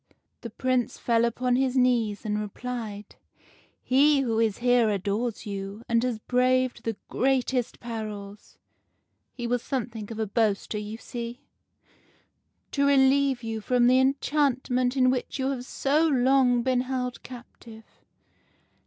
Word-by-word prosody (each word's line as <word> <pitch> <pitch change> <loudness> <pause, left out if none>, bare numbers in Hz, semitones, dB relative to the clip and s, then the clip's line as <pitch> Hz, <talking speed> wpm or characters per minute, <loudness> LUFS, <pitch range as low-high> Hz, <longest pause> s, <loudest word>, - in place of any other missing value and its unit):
" - - -51
The 235 - -6
Prince 255 +2 -1
fell 230 -1 +2
upon 245 +1 0
his 260 0 0
knees, 235 -5 +1
and 210 0 -1
replied: 210 -1 -6 0.3
— - - -32
'"He 280 +2 +4
who 230 -4 0
is 220 -3 +1
here 245 -2 +3
adores 210 +4 -2
you, 200 +1 -6
and 230 0 +2
has 250 -3 -1
braved 255 +2 +1
the 225 -3 -2
greatest 255 -2 0
perils 210 -3 -7 0.4
' - - -49
(he 240 - -4
was 245 0 0
something 235 -5 -4
of 225 - -6
a 220 - -1
boaster, 210 0 0
you 210 +1 -6
see) 235 +2 -7 0.7
' - - -40
to 280 0 +1
relieve 270 -2 +3
you 225 -1 -4
from 245 +2 +2
the 255 +1 +5
enchantment 260 -2 +1
in 255 -1 +4
which 255 +1 -3
you 265 0 0
have 250 -2 -5
so 295 +5 +1
long 255 -3 +3
been 255 -1 +1
held 250 -1 -3
captive. 235 -2 -12
245 Hz, 150 wpm, -26 LUFS, 225-255 Hz, 0.7 s, the